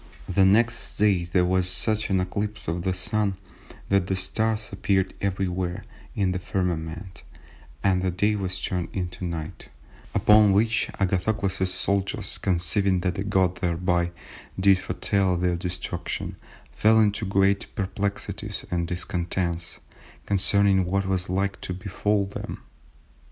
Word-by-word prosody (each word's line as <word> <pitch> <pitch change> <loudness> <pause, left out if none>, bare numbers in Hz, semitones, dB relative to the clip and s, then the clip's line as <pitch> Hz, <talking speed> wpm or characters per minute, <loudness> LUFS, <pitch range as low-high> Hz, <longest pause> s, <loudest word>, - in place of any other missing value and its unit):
The 95 +1 +3
next 115 +4 +2
day 100 -4 +2
there 90 +1 +2
was 90 0 +4
such 110 +3 0
an 95 -1 +2
eclipse 100 +3 -3
of 85 +2 -2
the 95 +1 0
Sun, 100 +2 -1 0.5
that 100 -2 +2
the 95 - 0
stars 110 +4 -1
appeared 95 -1 0
everywhere 95 -2 -2 0.3
in 95 -3 +1
the 90 - -2
firmament, 90 -1 -3 0.6
and 95 -2 +2
the 95 - 0
day 105 +4 +1
was 95 -2 0
turned 90 -1 -2
into 90 -1 -4
night, 85 -3 -5 0.5
upon 105 -1 +6
which 110 +2 +2
Agathocles's 95 0 +1
soldiers 100 +1 +1
(conceiving 95 +1 +1
that 95 +2 -2
God 95 -2 +2
thereby 85 0 0 0.5
did 95 -1 +5
foretell 95 -1 0
their 90 0 +1
destruction) 90 0 -4 0.4
fell 110 +1 +4
into 105 0 +2
great 100 0 +2
perplexities 100 +1 -3
and 85 -1 -1
discontents 85 -1 -2 0.4
concerning 100 -1 +3
what 100 +2 0
was 95 -2 -1
like 100 +2 -1
to 90 - -4
befall 100 +1 -1
them." 100 - -7
95 Hz, 130 wpm, -25 LUFS, 90-100 Hz, 0.6 s, upon